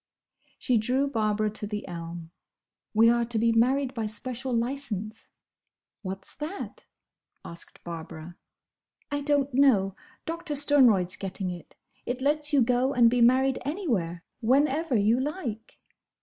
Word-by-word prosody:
She 245 -4 +1
drew 255 +6 +1
Barbara 215 -4 0
to 210 0 -4
the 210 0 -5
elm. 170 -1 -7 0.6
"We 225 +1 +5
are 235 0 +2
to 230 -1 -2
be 230 +1 +3
married 255 +4 +2
by 225 -4 -2
special 250 +4 -4
licence." 230 -4 -3 0.7
"What's 190 -1 -6
that?" 320 +7 -6 0.6
asked 170 0 -9
Barbara. 165 0 -8 0.8
"I 285 0 -1
don't 285 -1 +1
know. 220 -8 +4 0.3
Doctor 330 -2 -4
Sternroyd's 255 -11 +4
getting 190 -1 -4
it. 175 -2 -10 0.3
It 245 +1 -2
lets 295 +2 +1
you 280 -4 +5
go 250 +3 +1
and 235 -2 +6
be 245 0 +2
married 260 +2 +4
anywhere, 230 - -2 0.2
whenever 280 +4 +2
you 220 +3 +3
like." 260 - -5
240 Hz, 135 wpm, -27 LUFS, 210-275 Hz, 0.8 s, and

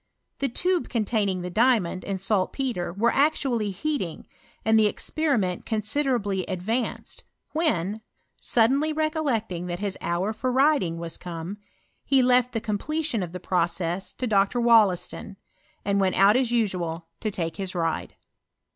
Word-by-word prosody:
The 275 - 0
tube 355 +8 0
containing 210 -5 0
the 180 - -4
diamond 215 -5 +2
and 195 -1 -3
saltpetre 195 +1 0
were 220 +6 +1
actually 250 -9 +1
beating, 285 - -2 0.4
and 220 0 +5
the 215 - +5
experiment 215 - 0
considerably 215 -3 0
advanced, 220 +7 -3 0.3
when, 220 - 0 0.4
sud 230 0 +4
denly 305 +3 0
recollecting 255 - -1
tliat 175 0 -3
his 200 0 -3
hour 180 +5 -1
for 255 +4 -2
riding 265 - +3
wai 170 - -5
ootue, 170 +2 -6 0.5
he 270 -2 +3
left 250 0 +3
the 225 - 0
completion 230 +4 -2
of 175 -2 -4
the 180 - -6
process 175 +1 -1
to 255 - -3
Dr. 205 +1 +2
Wollaston, 215 -5 +3 0.5
and 200 0 +2
went 190 -1 +2
out 200 +3 +6
as 255 -2 +2
usual 180 -8 -1
to 215 - -1
take 165 -5 -3
hia 195 -2 -3
ride. 165 -2 -2
210 Hz, 145 wpm, -25 LUFS, 185-250 Hz, 0.5 s, out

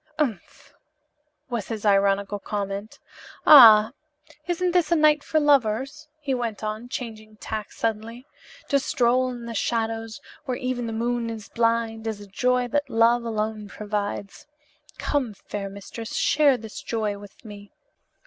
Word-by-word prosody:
"Umph!" 245 - -4 0.7
was 235 -6 -4
his 220 -2 -5
ironical 200 0 +2
comment. 200 +1 -5 0.5
"Ah, 225 -6 +9 0.6
isn't 355 +1 0
this 345 -3 +1
a - - +5
night 305 -2 +4
for 315 - +1
lovers?" 280 +1 +1
he 285 -3 -2
went 235 -4 -3
on, 215 +3 -4
changing 220 -4 -7
tack 215 0 -6
suddenly. 230 +2 -4 0.4
"To 280 - +3
stroll 255 -2 +1
in 240 -2 -7
the 235 - -6
shadows, 225 0 -2 0.3
where 255 -3 -2
even 255 -2 -3
the - - -4
moon 235 +1 -1
is 225 -2 -7
blind, 230 -1 0
is 220 -2 -3
a 205 - -10
joy 250 +5 0
that 290 +4 -1
love 230 +1 +3
alone 215 -2 -3
provides. 205 +2 -5 0.5
Come, 255 -8 -1
fair 200 0 -6
mistress, 200 +3 -8
share 285 -3 +3
this 220 -2 -9
joy 215 -3 -2
with 205 +3 -15
me." 205 -1 -11
230 Hz, 145 wpm, -24 LUFS, 210-255 Hz, 0.7 s, Ah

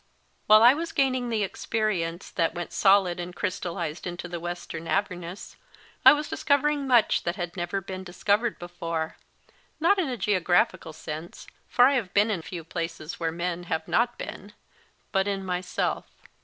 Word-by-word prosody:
While 215 +1 +8
I 245 +2 +9
was 330 +3 -4
gain 270 -2 +3
ing 250 -1 -2
the 220 -2 0
experience 190 -5 -2
that 165 0 0
went 175 0 -5
solid 190 -3 +4
and 175 0 -6
crys* 185 -2 -2
tallised 170 -1 -4
into 175 0 -5
The 175 -1 -5
Wes 175 +1 -5
tern 165 0 -7
Avernus, 180 -2 -3 0.5
I - - +11
was 295 0 0
discovering 285 0 +1
much 240 -4 +4
that 170 +1 -2
had 175 -2 -5
never 175 +2 -2
been 190 0 -7
dis 175 -1 -12
covered 210 +3 +2
before, 165 -2 -4 0.6
not 360 +5 +4
in 330 -7 0
a 250 - -3
geographical 185 -4 +1
sense 160 +2 -7 0.2
for 245 - +6
I 275 - +5
have 225 -9 -2
been 210 +2 +4
in 185 -6 -1
few 170 0 -7
places 165 -1 -5
where 165 -1 0
men 175 +1 -3
have 160 -2 -2
not 240 +1 +1
been 205 +1 -8 0.6
but 195 -1 +1
in 195 -1 -2
myself. 180 0 -2
185 Hz, 180 wpm, -26 LUFS, 175-220 Hz, 0.6 s, I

